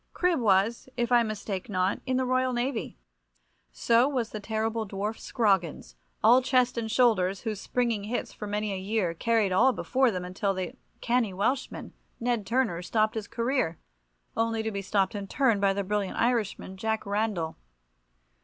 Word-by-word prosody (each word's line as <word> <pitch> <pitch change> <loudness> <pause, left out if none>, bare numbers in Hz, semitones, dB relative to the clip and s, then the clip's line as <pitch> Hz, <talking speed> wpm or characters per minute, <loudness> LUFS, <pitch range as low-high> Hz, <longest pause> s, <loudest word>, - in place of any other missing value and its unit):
Cribb 355 -4 +2
was, 220 +3 +2
if 240 0 0
I 240 -1 +6
mistake 215 -2 -4
not, 185 -1 0
in 260 0 +1
the 260 - +1
Royal 255 0 +1
Navy. 240 - -2 0.7
So 235 - +3
was 245 -5 -2
the 215 - -5
terrible 220 +1 -2
dwarf 205 +3 -3
Scroggins, 190 - 0 0.3
all 245 +4 +7
chest 255 -1 +2
and 230 -2 -3
shoulders, 210 -6 +2
whose 215 -3 -4
springing 235 -5 -1
hits 235 +4 -3
for 210 - -7
many 210 0 -2
a - - -3
year 190 -3 -1
carried 220 +2 +1
all 250 +8 +4
before 260 +1 +2
them 180 -4 -3
until 195 +2 -1
the 185 -1 -4 0.3
canny 235 -5 +1
Welshman, 250 +8 -2 0.3
Ned 235 -4 -1
Turner, 230 -8 +1
stopped 215 +3 +1
his 220 -3 -4
career, 235 - -1 0.6
only 225 -1 0
to 220 - -2
be 200 -1 -3
stopped 195 0 +1
in 200 -1 -5
turn 235 -3 +2
by 200 -1 +3
the 200 +1 -1
brilliant 200 0 -2
Irishman, 225 -5 -1
Jack 220 +2 -2
Randall. 200 -5 -1
220 Hz, 170 wpm, -28 LUFS, 195-240 Hz, 0.7 s, all